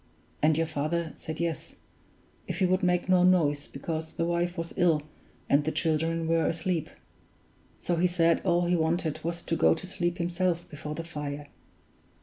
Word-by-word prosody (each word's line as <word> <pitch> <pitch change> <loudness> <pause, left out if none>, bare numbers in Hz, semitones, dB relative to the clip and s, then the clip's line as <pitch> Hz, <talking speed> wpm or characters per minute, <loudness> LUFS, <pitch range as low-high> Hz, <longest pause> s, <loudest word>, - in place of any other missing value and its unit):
And 155 0 +4
your 165 - +2
father 160 +2 -2
said 160 0 -6
yes, 170 -4 -3 0.7
if - - -3
he 190 - +3
would 185 +1 +2
make 180 -1 +1
no 185 -1 +5
noise, 155 -6 +3
because 160 +3 -5
the 165 - 0
wife 175 +1 0
was 165 0 -4
ill, 165 -4 +3 0.4
and 145 +1 +4
the 155 - -1
children 165 +1 0
were 165 0 +2
asleep. 165 -1 -1 0.9
So 175 - -2
he 180 +2 +4
said 170 -2 +2
all 175 -1 +2
he 175 +1 +2
wanted 160 -1 0
was 170 +1 -3
to 165 - -1
go 165 - +4
to 165 - -8
sleep 175 -2 -2
himself 175 0 -1
before 150 0 -6
the 165 - -4
fire. 145 -3 -6
165 Hz, 175 wpm, -28 LUFS, 155-175 Hz, 0.9 s, no